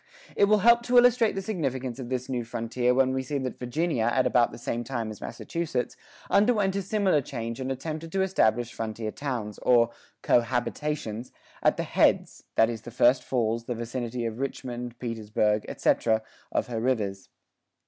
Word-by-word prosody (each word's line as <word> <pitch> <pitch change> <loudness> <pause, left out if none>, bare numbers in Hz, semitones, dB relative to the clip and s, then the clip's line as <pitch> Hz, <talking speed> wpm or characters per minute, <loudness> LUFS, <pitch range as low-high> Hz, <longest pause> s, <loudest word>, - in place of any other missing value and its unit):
It 200 - +5
will 210 +1 +4
help 235 0 +7
to 250 0 +4
illustrate 245 -2 +5
the 195 - -3
significance 135 - -3
of 125 -2 -6
this 130 -1 -2
new 125 -3 -2
frontier 115 +2 -1
when 130 0 +3
we 130 - 0
see 140 +2 -3
that 130 -2 -4
Virginia 125 0 0
at 130 +1 +2
about 120 -1 +3
the - - -9
same 120 0 -3
time 115 -3 -3
as 105 - -11
Massachusetts 165 -7 -3 0.3
underwent 205 -2 +3
a 200 - 0
similar 190 -5 +2
change 115 -2 -5
and 130 0 -2
attempted 155 +4 -5
to 190 0 +2
establish 120 - +1
frontier 110 -1 -4
towns, 120 -7 -4
or 120 -1 +4 0.3
"co - - +5
habitations," 120 -1 -3 0.3
at - - +3
the - - -1
"heads," - - +1
that 115 - +5
is 115 -2 -4
the 120 - -9
first 125 +2 +3
falls, 115 -2 -1
the 120 - -3
vicinity 120 +1 -4
of 115 +1 -4
Richmond, 125 -3 -4
Petersburg, 110 -2 0
etc., 110 -1 +1 0.3
of - - 0
her 120 -2 -3
rivers. 105 -6 -1
125 Hz, 180 wpm, -27 LUFS, 115-150 Hz, 0.3 s, help